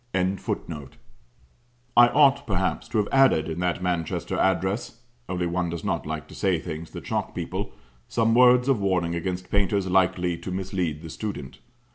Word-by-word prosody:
] - - -39
never. 95 +1 0 1.4
I 120 0 +8
ought, 140 +1 +4
perhaps, 95 -2 -1
to - - -2
have 105 -1 +2
added 135 -12 +4
in 80 +1 -4
that 90 0 -1
Manchester 85 -3 -2
address 95 +5 0 0.3
(only 90 -1 -1
one 85 0 -1
does 85 -1 -5
not - - -2
like 80 -3 -4
to - - -12
say 95 -3 +1
things 80 +1 -6
that - - -8
shock - - -2
people) - - -4 0.3
some 115 -1 +2
words 125 +1 +6
of 130 -7 +2
warning 90 -3 +1
against 90 +1 -4
painters 100 -1 +1
likely 90 -2 +1
to - - -7
mislead 90 -4 -2
the 80 - -7
student. 85 -11 -6
95 Hz, 170 wpm, -25 LUFS, 85-105 Hz, 1.4 s, I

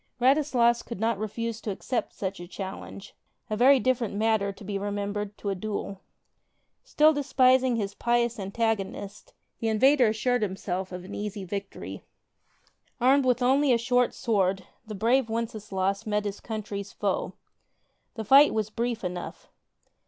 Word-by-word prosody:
Radislas 250 -3 +3
could 235 - -7
not 225 -2 0
refuse 225 +1 -4
to 215 - -5
accept 230 +5 -3
such 195 -1 -4
a 175 - -8
challenge 195 +1 -8 0.2
— - - -47
a - - +1
very 260 +4 +6
different 245 -5 0
matter, 215 -2 +1
be 200 +1 -7
it - - -4
remembered, 205 0 -3
to 200 - -3
a - - 0
duel. 200 0 -5 0.8
Still 310 +1 +4
despising 260 -3 +3
his 200 -3 -2
pious 235 +1 0
antagonist, 200 -1 -3 0.3
the 225 - -1
invader 255 +4 +4
as 215 - 0
sured 245 +2 +1
himself 190 -2 -3
of 180 0 -6
an 190 - -9
easy 205 -1 -4
victory. 200 +1 -6 1.0
Armed 265 +2 +4
with 250 0 +2
only 270 +2 +3
a 240 - +5
short 245 +1 +1
sword, 195 -4 0 0.2
the 215 - -6
brave 230 +4 +2
Wenceslaus 215 -2 -2
met 210 0 0
his 205 0 -4
country's 205 -3 -5
foe. - - -2 0.8
The 220 -2 -5
fight 275 +5 +7
was 215 -1 -1
brief 235 0 -2
enough. 180 -1 -6
220 Hz, 155 wpm, -27 LUFS, 200-245 Hz, 1.0 s, fight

